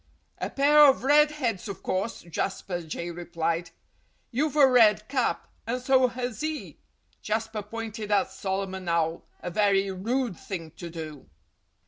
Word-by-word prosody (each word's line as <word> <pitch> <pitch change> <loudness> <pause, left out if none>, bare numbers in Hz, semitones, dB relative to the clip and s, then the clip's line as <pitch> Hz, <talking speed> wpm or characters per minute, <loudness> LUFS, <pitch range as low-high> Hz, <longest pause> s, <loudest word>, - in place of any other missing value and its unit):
"A - - -2
pair 290 +2 +4
of 270 - +3
red 295 +2 +6
heads, 240 -10 -2
of 200 - -7
course!" 195 +5 -2
Jasper 175 +1 -3
Jay 170 +1 -5
replied. 170 0 -2 0.6
"You've 290 +5 0
a 290 -2 +7
red 220 -5 +5
cap—and 250 -2 -2
so 255 0 +4
has 245 0 -4
he!" 310 0 -4 0.4
Jasper 220 0 -2
pointed 215 0 -6
at 205 -1 +2
Solomon 190 -2 -3
Owl 165 0 0 0.2
(a 175 - -4
very 195 0 +2
rude 230 +3 -1
thing 165 -5 -6
to 170 +2 -8
do!). 155 -4 -8
210 Hz, 140 wpm, -27 LUFS, 175-250 Hz, 0.6 s, a